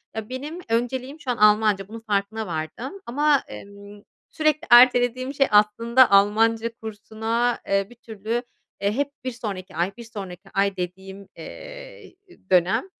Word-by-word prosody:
ya, 220 0 -5
benim 290 +7 -6
önceliğim 255 +5 -2
şu 260 -4 -3
an 240 - -3
Almanca, 210 -2 +3
bunun 225 +2 -9
farkına 210 +1 -1
vardım. 200 - -5
Ama, 290 +3 +2
emm, 200 0 -12 0.3
sürekli 310 +1 0
ertelediğim 245 +2 +5
şey 275 -1 +2
aslında 230 +4 +4
Almanca 220 +3 +3
kursuna, 220 +2 -2
eee, 195 0 +1
bir 240 - -15
türlü, 225 +1 -4 0.4
eee, 200 +1 +1
hep 285 +5 -2
bir 255 - -3
sonraki 195 -6 -7
ay, 175 +4 0
bir 235 - -9
sonraki 195 -4 -9
ay 195 0 +1
dediğim, 190 +2 -7
eee, - - -11 0.4
dönem, 180 - +3
225 Hz, 145 wpm, -23 LUFS, 200-255 Hz, 0.4 s, ertelediğim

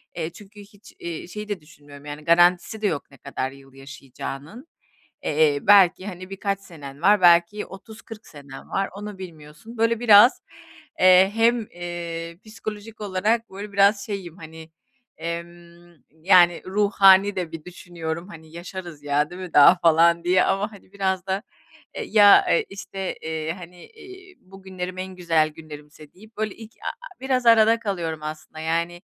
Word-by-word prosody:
Eee, 165 -1 -3
çünkü 205 +3 -15
hiç, 205 +1 -18
eee, 170 -1 -6
şeyi 210 +3 -8
de 200 -5 -4
düşünmüyorum, 145 -2 -16
yani, 150 +1 -8
garantisi 175 +5 +3
de 210 - +1
yok 150 -6 -4
ne 140 - -17
kadar 130 0 -5
yıl 135 -1 -17
yaşayacağının. 140 - -9 0.6
Eee, 150 -1 +2
belki, 195 -1 +5
hani, 185 -1 -8
birkaç 195 0 -3
senen 145 -6 -12
var, 205 +1 +4
belki 175 +4 +4
30-40 220 +2 -12
senen 140 -3 -12
var 195 0 -1
onu 205 -1 -8
bilmiyorsun. 165 +5 -12
Böyle 230 0 +1
biraz, 225 +1 +6 0.6
eee, 185 +1 +6
hem, 235 +1 +3
eee, 170 -1 -6
psikolojik 215 0 -9
olarak 210 +3 -1
böyle 200 +2 -9
biraz 200 0 +3
şeyim, 190 -5 -6
hani, 160 -1 -12 0.5
emm, 170 +1 -8 0.2
yani, 175 +1 +4
ruhani 195 0 +4
de 180 -3 -4
bir 160 -2 -8
düşünüyorum, 170 -1 -7
hani, 160 -3 -13
yaşarız 175 -2 -9
ya 145 +1 0
değil 180 +1 -9
mi 180 -3 -8
daha 145 +5 +8
falan 170 0 +3
diye 180 +1 +3
ama, 200 +3 -1
hani, 200 -2 -17
biraz 190 -2 -2
da, 190 +2 -2 0.5
eee, 460 - -4
ya, 205 -2 +6
eee, - - +2
işte, 195 -1 -6
eee, 160 0 -3
hani, 175 0 -13
eee, 380 -4 -15
bugünlerim 185 -1 -8
en 185 0 -6
güzel 165 -3 +1
günlerimse 150 -1 -13
deyip 215 +4 -19
böyle 215 -2 -3
ilk 225 0 -12
a - - -2
a - - -11
biraz 260 -2 -1
arada 230 0 +5
kalıyorum 170 -7 -4
aslında, 155 +1 -8
yani. 170 +2 -2
180 Hz, 160 wpm, -23 LUFS, 160-205 Hz, 0.6 s, daha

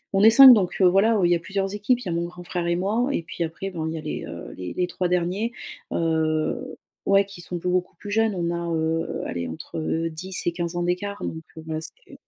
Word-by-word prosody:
on 195 - +4
est 220 - +10
5 265 +2 +10
donc, 190 -6 +1
heu, 190 - +5
voilà, 205 +4 +4
il 175 - +3
y - - +5
a - - -1
plusieurs 195 +3 -3
équipes- 210 +4 +1
il - - -9
y - - -3
a - - -1
mon 170 +1 -1
grand 175 +1 -9
frère 175 -1 -3
et 170 - +2
moi 215 +8 0
et 170 - -1
puis 170 - -4
après 170 +4 -5
bon 160 -3 -3
il 160 - -3
y - - -4
a - - -5
les, 155 - -5
heu, - - -8
les 90 -1 -6
les 180 - 0
3 180 0 -2
derniers, 180 +6 0 0.4
heu, 160 +9 -1 0.3
ouais, 195 0 +4
qui 195 -3 -11
sont 175 0 -5
beaucoup 180 +1 -1
plus 205 - -8
jeunes, 220 -1 +2
on 170 -1 -1
a, 170 0 -3
heu, 160 +1 -1
allez 85 -1 -3
entre 160 - -3
10 180 +4 -3
et - - +3
15 170 0 -3
ans 175 - -1
d'écart 185 +3 -2
donc 160 0 -5 0.2
voilà 155 0 -3
ce - - -4 0.2
que - - -16
175 Hz, 260 wpm, -24 LUFS, 165-195 Hz, 0.4 s, est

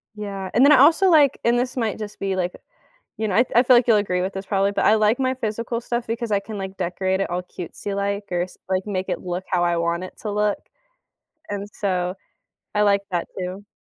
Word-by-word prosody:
Yeah. 195 -2 -5
And 250 +4 +6
then 295 - +7
I - - +8
also, 325 +7 +6
like, 295 -5 +5
and 240 +1 +3
this 250 +1 -2
might 225 -4 -1
just 210 -1 -7
be, 195 -1 -2
like, 180 -1 -1 0.6
you 220 -1 -2
know, 185 - -1
I 240 - +6
I 240 - +7
feel 255 -1 +6
like 240 - +4
you'll 220 -3 +5
agree 180 -3 0
with 190 +1 -2
this 195 0 -6
probably, 200 0 +1
but - - 0
I 215 - +6
like 215 +3 +3
my 260 0 +1
physical 230 0 -3
stuff, 240 0 -3
because 230 0 -3
I 200 - +3
can, 210 0 -7
like, 190 0 -6
decorate 190 +1 -1
it 195 - -1
all 180 +1 -2
cutesy 180 +3 -7
like 200 +1 -2
or 175 0 0
s 180 - -7
like, 190 0 0
or 205 - -4
make 185 0 -2
it - - -2
look 180 +1 -4
how 175 -2 +2
I 175 0 +1
want 170 +2 -1
it - - -10
to 210 - -3
look. 210 0 +1 0.9
And 205 0 -4
so, 180 -2 -1 0.6
I 210 - +3
like 200 -1 +3
that, 175 -2 -1
too. 185 +3 -5
200 Hz, 250 wpm, -23 LUFS, 185-225 Hz, 0.9 s, I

